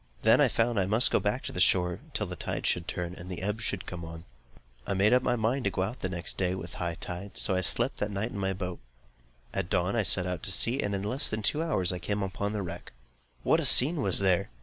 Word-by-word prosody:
Then - - +5
I - - +6
found 115 -2 0
that - - +3
I - - 0
must 110 +2 +3
go - - +3
back - - -2
to - - -5
the - - -5
shore 90 -2 +2 0.2
till - - -1
the - - -7
tide - - -4
should 85 -1 0
turn, 90 -1 -4
and 90 0 -10
the 90 0 -6
ebb 105 +3 -2 0.2
come 90 -2 -7
on. 80 0 -9 0.6
I 100 - -1
made 100 +4 +3
up 125 - +4
my 125 - 0
mind 120 +3 -1
to - - +3
go 95 - -2
out 110 +7 -5
the 95 - -3
next 85 -2 -3
day 90 -1 0
with 85 -1 -7
the - - -11
high 85 -2 -2
tide, 90 +4 -7
so 95 - +2
I 95 - +1
slept 90 - +2
that 105 - -2
night 105 +4 -3
in 100 - -6
my 95 0 -1
boat. 90 -2 -5 0.7
At 95 -2 -3
dawn 90 +4 0
I 115 - +2
set 90 -2 +4
out 90 -3 -4
to - - 0
sea, 115 +6 +4
and 100 0 -2
in 95 - -4
less 125 +7 0
than 110 0 -3
two 150 +9 +1
hours 95 - +1
I 90 - -5
came 100 +3 -2
up 95 - -4
to 100 - -1
the 105 -1 -3
wreck. 85 - -8 0.5
What - - +3
a - - -1
scene 150 +4 +6
was 95 -7 +2
there! 95 -3 +2
95 Hz, 280 wpm, -28 LUFS, 90-110 Hz, 0.7 s, I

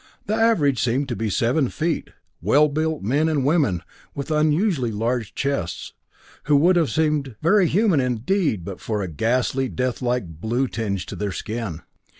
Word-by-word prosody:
The 210 - -1
average 215 - +3
seemed 130 +4 0
to 120 - -2
be 110 -1 -2
seven 120 +6 +1
feet 165 0 -2 0.3
well 145 - +4
built 155 -1 -1
men 145 +9 +1
and 145 -4 0
women 140 - +2 0.3
with 140 +2 -5
unusually 155 - +2
large 115 +1 -2
chests, 140 -12 -3 0.5
who 150 - +3
would 170 +6 +5
have 165 -4 +2
seemed 150 -6 0
very 190 +2 +4
human 190 -2 +3
indeed, 125 - 0
but 95 -1 -7
for 105 -3 -2
a - - -3
ghastly, 125 - 0
death 125 0 -2
like 125 -3 0 0.2
blue 120 +4 0
tinge 100 -6 -3
to - - -7
their 105 -1 -3
skin. 105 -5 -5
135 Hz, 165 wpm, -23 LUFS, 115-155 Hz, 0.5 s, would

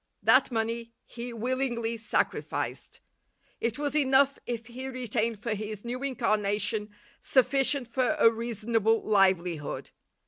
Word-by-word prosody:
That - - +5
money 230 0 -2
he 240 +1 -7
willingly 240 -1 -1
sacrificed. 220 -1 -2 0.6
It 230 +2 -1
was 290 0 -1
enough 275 -1 +3
if 235 -2 -3
he 250 +3 -7
retained 235 -3 -1
for 225 +2 -3
his 215 0 -5
new 245 +2 -4
incarnation 215 -5 0 0.3
sufficient 270 0 +2
for 255 +5 +1
a 230 -6 +6
reasonable 225 -1 0
livelihood. 180 -7 +1
230 Hz, 115 wpm, -28 LUFS, 215-255 Hz, 0.6 s, a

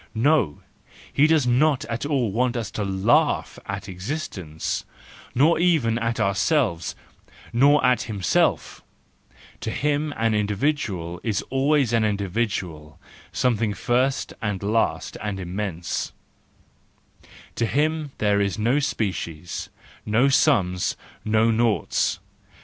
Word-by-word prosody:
No! 115 - +2 0.5
he 145 +2 +5
does 160 -4 +3
not 135 +3 +2
at 115 +4 -3
all 130 -8 0
want 125 +3 0
us 115 -4 -4
to 105 - -3
laugh 100 +4 +1
at - - -5
existence, 90 - -4 0.5
nor 155 +6 +4
even 150 -10 +2
at 115 0 -1
ourselves 100 - +1 0.6
—nor 140 +5 +5
at 125 -2 +3
himself; 100 -6 0 0.8
to 115 - -4
him 150 +4 0
an 115 0 +1
individual 105 - -1
is 110 -5 -1
always 135 -2 +2
an 115 -1 +3
individual, 100 -6 -2 0.3
something 115 -4 0
first 130 +3 0
and 105 -4 -2
last 110 +3 0
and 105 -2 -3
immense, 90 -1 -3 1.4
to 115 - 0
him 155 +2 0
there 105 -1 +2
are 100 - +2
no 120 +6 +2
species, 95 - -3 0.3
no 115 +6 +3
sums, 100 - +2 0.3
no 110 +1 +3
noughts. 115 -1 +1
115 Hz, 115 wpm, -24 LUFS, 100-135 Hz, 1.4 s, he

